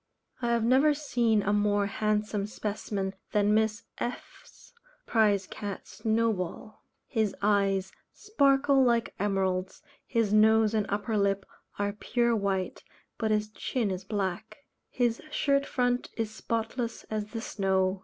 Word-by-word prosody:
I 240 - 0
have 235 -1 +2
never 270 +5 +4
seen 235 -7 +1
a 205 - +1
more 205 -1 +2
handsome 210 0 -1
specimen 200 -2 -3 0.2
than 210 0 +3
Miss 220 0 +1 0.2
F 240 - -5
n's - - -20 0.3
prize 205 -4 +3
cat 200 0 -6
"Snowball." 220 -3 -2 0.2
His 220 -4 -1
eyes 195 -2 +2 0.2
sparkle 280 -9 +3
like 235 -2 +2
emeralds; 190 +2 -1 0.2
his 225 -4 +1
nose 220 0 +5
and 215 -2 +1
upper 210 +2 -1
lip 200 -1 +1 0.3
are 205 0 -1
pure 235 +2 +1
white, 195 -3 -2 0.4
but 220 - 0
his 210 0 +1
chin 220 -1 -2
is 185 0 -4
black. 210 +7 -4 0.2
His 240 -2 0
shirt 280 -2 +1
front 245 -1 0
is 225 -2 -2
spotless 230 +2 -3
as 215 -1 -2
the 225 +1 -5
snow. 190 -2 0
215 Hz, 135 wpm, -29 LUFS, 200-235 Hz, 0.4 s, nose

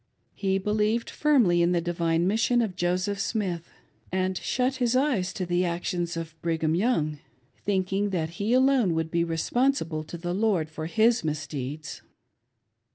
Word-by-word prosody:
He 195 -1 0
believed 210 +3 0
firmly 240 -13 +3
in 170 +1 +3
the 175 - +2
divine 170 -1 0
mission 230 +4 +2
of 195 -5 -3
Joseph 185 +3 0
Smith, 185 -6 -2 0.4
and 185 0 0
shut 255 +7 -1
his 245 -1 +1
eyes 255 -9 +1
to 185 - -3
the 175 +1 +1
actions 175 0 -2
of 165 -1 -5
Brigham 160 -1 0
Young, 165 -7 +1 0.4
thinking 195 0 -1
that 165 -4 -2
he 210 +3 0
alone 255 -8 +4
would 160 0 -2
be 170 -1 +2
responsible 165 - 0
to 170 - -7
the 175 +1 -3
Lord 190 -6 +1
for 155 +1 -5
his 225 +4 +3
misdeeds. 150 -1 -4
180 Hz, 155 wpm, -26 LUFS, 165-220 Hz, 0.4 s, alone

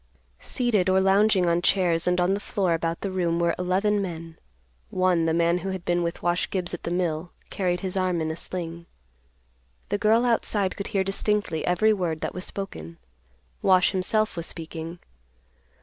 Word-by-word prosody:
Seated 215 -7 +1
or 190 0 +4
lounging 195 0 +4
on 170 0 +2
chairs 175 -3 +2
and 180 0 +2
on 180 +2 +2
the 200 - -1
floor 190 -4 0
about 165 0 -2
the 195 - -3
room 175 -3 0
were 170 -1 +2
eleven 195 +3 +1
men; 165 -3 -6 0.5
one, 185 -3 +2
the 165 - +2
man 170 +1 +2
who 195 +2 -4
had 190 -2 -5
been 175 0 +1
with 170 0 -3
Wash 175 +1 +1
Gibbs 180 -3 0
at 175 - -5
the - - -4
mill, 175 -1 -1 0.2
carried 180 -2 -1
his 190 -1 -3
arm 185 -2 +1
in 160 0 -1
a - - -4
sling. 170 -1 -6 1.0
The 205 - 0
girl 225 +3 +3
outside 210 -5 +1
could 200 - -5
hear 195 -3 0
distinctly 195 -3 -1
every 195 +5 +3
word 170 -5 -2
that - - -3
was 180 - -6
spoken. 85 - -6 0.6
Wash, 185 -1 +4
himself, 215 +3 0
was 170 -1 -4
speaking. 165 +1 -7
180 Hz, 180 wpm, -25 LUFS, 170-195 Hz, 1.0 s, or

